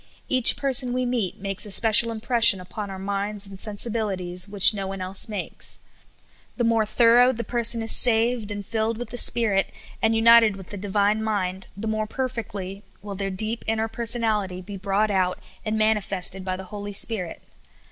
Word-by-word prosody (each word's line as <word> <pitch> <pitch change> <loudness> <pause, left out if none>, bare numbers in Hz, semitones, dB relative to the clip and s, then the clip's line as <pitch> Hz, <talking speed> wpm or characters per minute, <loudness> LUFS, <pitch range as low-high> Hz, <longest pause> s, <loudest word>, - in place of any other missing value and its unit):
Kach 255 -3 +4
per 275 -2 -2
son 250 -1 +2
we 255 0 -1
meet 240 -7 -3
makes 195 0 0
a 210 - -3
special 225 +3 +5
impression 225 -3 +4
upon 200 +3 -8
our 190 - -7
minds 200 +1 -4
and 195 -1 -11
sensibilities 200 -4 -2
which 200 +1 +7
no 195 -2 -5
one 195 0 -6
else 185 +3 -1
makes. 210 - -5 0.8
The 240 - -1
more 225 -2 +1
thorough 240 +3 +4
the 235 -2 -5
person 235 -1 +1
is 225 - +1
saved 230 -2 +1
and 205 -1 -6
filled 220 +1 -2
with 240 -1 -7
the 245 - -6
Spirit, 210 -5 +2 0.3
and 225 0 +1
united 225 -2 +5
with 190 -2 -12
the - - -6
divine 205 +2 0
mind, 190 -3 -3
the 220 +2 -5
more 215 0 -2
per 260 +3 -3
fectly 200 -5 -7 0.2
will 205 -1 -7
their 195 0 -4
deep 215 +4 0
inner 220 0 -1
personality 220 -5 -1
be 200 +2 -9
brought 200 +2 -1
out 185 -2 0 0.3
and 215 0 -3
manifested 195 -3 0
by 185 0 -3
the 190 - -8
Holy 205 0 -7
Spirit. 200 -4 0
210 Hz, 185 wpm, -23 LUFS, 195-230 Hz, 0.8 s, which